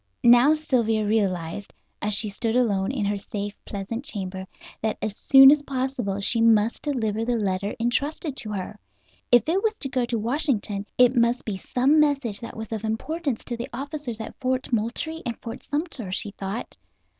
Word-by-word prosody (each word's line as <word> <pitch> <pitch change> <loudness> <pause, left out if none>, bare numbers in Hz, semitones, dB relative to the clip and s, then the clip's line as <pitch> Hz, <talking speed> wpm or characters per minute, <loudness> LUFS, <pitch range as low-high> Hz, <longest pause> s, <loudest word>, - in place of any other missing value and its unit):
Now 245 +6 +7
Sylvia 230 -8 +1
realized, 195 -3 -1 0.3
as 210 -1 0
she 215 - +1
stood 220 +3 -2
alone 205 -5 +2
in 240 -7 -2
her 205 0 0
safe, 205 0 -5
pleasant 205 +5 -5
chamber, 190 -6 -4 0.3
that 220 -1 -1
as 210 -1 -3
soon 270 +2 +8
as 295 0 +3
possible 255 -7 -2
she 225 +3 +3
must 225 0 +3
deliver 225 -7 -1
the 240 +1 0
letter 200 -2 -1
entrusted 280 +5 -1
to 215 - -4
her. 200 +2 -5 0.5
If 240 0 +5
it 360 +5 +2
was 445 0 0
to 270 - -3
go 255 -2 0
to 235 0 -2
Washington 225 -4 -1
it 250 +1 +5
must 235 +1 +2
be 210 - -2
some 260 +9 +2
message 275 -8 +1
that 230 - -8
was 220 0 -7
of 220 -1 -4
importance 275 +5 -2
to 240 - -4
the 235 +1 -6
officers 275 -2 -5
at 220 - -6
Fort 255 0 -1
Moultrie 235 +9 -1
and 235 -3 -4
Fort 230 +2 -7
Sumter, 290 - -3
she 205 +2 -2
thought. 195 +3 -6
230 Hz, 180 wpm, -25 LUFS, 210-265 Hz, 0.5 s, soon